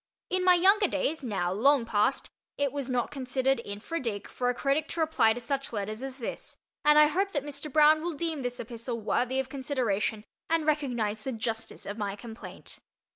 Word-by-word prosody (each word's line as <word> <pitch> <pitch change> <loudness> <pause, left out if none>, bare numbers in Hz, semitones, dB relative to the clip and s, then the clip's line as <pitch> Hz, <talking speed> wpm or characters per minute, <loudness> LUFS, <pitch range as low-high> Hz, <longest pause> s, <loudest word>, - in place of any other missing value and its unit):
In 370 0 +1
my 365 0 +7
younger 385 +4 +5
days, 325 - -1
now 190 -7 -1
long 260 +4 +4
past, 215 +3 +1 0.3
it 285 -2 +1
was 280 -2 -4
not 245 -2 0
considered 260 -1 0
infra 210 +12 -5
dig 220 -6 -3
for 245 -1 -1
a - - +2
critic 280 +4 0
to 335 - -6
reply 310 -9 +3
to 245 - -6
such 275 +3 -3
letters 215 +1 -3
as 265 -1 -5
this, 240 - -6 0.3
and 300 0 +6
I 300 - +9
hope 385 +6 0
that 285 -3 -1
Mr. 290 +1 -6
Broun 310 +1 +6
will 345 +1 -2
deem 315 -1 -2
this 245 -1 -3
epistle 230 +1 -5
worthy 250 +4 0
of 265 - -1
consideration, 250 -6 -1 0.3
and 325 -1 +2
recognize 240 -9 0
the 265 - -3
justice 225 -1 -4
of 205 +2 -5
my 200 -1 -2
complaint. 225 +2 -10
265 Hz, 195 wpm, -29 LUFS, 225-300 Hz, 0.3 s, I